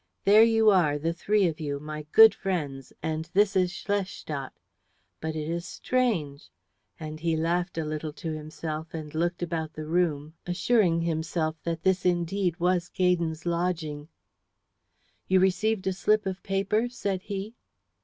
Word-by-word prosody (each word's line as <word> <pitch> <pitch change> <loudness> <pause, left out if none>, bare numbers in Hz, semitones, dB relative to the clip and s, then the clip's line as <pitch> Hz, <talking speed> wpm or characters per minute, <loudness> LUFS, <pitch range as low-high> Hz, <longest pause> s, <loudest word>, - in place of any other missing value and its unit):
"There 210 +2 +7
you 225 -1 +5
are, 160 -7 +3
the 165 +3 -1
three 205 +4 +2
of 160 -1 -3
you, 145 -2 -3
my 150 0 -7
good 220 0 +9
friends, 150 -9 -3
and 160 0 -3
this 200 0 +4
is 180 -1 +3
Schlestadt. 185 -8 -3 0.7
But 160 0 -4
it 155 -1 -3
is 170 +1 -2
strange," 180 - -1 0.5
and 155 -1 -6
he 165 0 0
laughed 175 +2 -1
a 160 - -1
little 155 0 -4
to 160 +2 -5
himself 155 +1 -6
and 155 -2 -6
looked 175 +2 -1
about 160 -2 -3
the 155 0 -6
room, 155 -2 0
assuring 175 -2 +2
himself 160 -1 -1
that 165 -1 -3
this 190 -1 +2
indeed 175 0 0
was 180 0 +1
Gaydon's 170 -3 0
lodging. 170 -4 -2 1.2
"You 190 - +4
received 190 +2 +1
a 190 - +1
slip 210 +3 +2
of 190 -1 -3
paper?" 200 +4 0
said 200 -6 -3
he. 200 +2 -5
170 Hz, 155 wpm, -27 LUFS, 155-190 Hz, 1.2 s, good